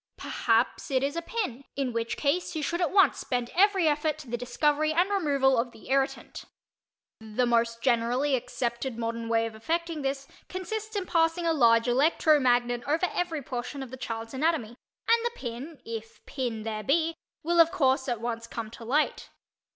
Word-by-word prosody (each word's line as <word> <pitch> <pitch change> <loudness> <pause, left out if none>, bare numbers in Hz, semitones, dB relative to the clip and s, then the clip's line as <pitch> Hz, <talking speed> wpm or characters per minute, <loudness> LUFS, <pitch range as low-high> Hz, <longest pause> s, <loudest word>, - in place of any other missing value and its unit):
Perhaps 230 +1 0
it 265 -1 +1
is 285 +3 -1
a 335 - -1
pin, 335 - -3
in 270 -3 -1
which 230 0 -2
case 310 +5 0
you 310 - -2
should 345 +5 -1
at 345 - +2
once 390 0 +4
bend 245 -2 -2
every 385 -2 +4
effort 305 +1 +1
to 305 -4 -11
the 240 - -2
discovery 295 +5 +1
and 350 +5 +2
removal 280 -9 +2
of 240 +1 -1
the 220 - -14
irritant. 270 0 -1 0.7
The 220 +3 -1
most 230 -1 +1
generally 250 +3 +2
accepted 245 0 -3
modern 230 0 -3
way 225 0 +2
of 225 - -5
effecting 325 +7 -2
this 275 0 -3 0.2
consists 435 +4 -5
in 395 -2 -1
passing 330 0 +1
a 330 - +3
large 230 -5 +4
electro 295 +4 +4
magnet 245 -2 +2
over 320 +5 +2
every 330 -5 -2
portion 250 +2 -5
of 255 - -10
the - - -5
child's 225 -2 -5
anatomy 295 -4 0 0.4
and 460 0 +4
the 475 - 0
pin 270 - -7
(if 225 0 -8
pin 240 -5 -3
there 215 -1 -3
be) 320 +8 +1 0.3
will 340 +2 +1
of 330 0 +7
course 265 -6 +1
at 240 -3 -1
once 230 0 -4
come 225 -2 -6
to 235 - -10
light. 285 +7 0
270 Hz, 185 wpm, -28 LUFS, 235-325 Hz, 0.7 s, of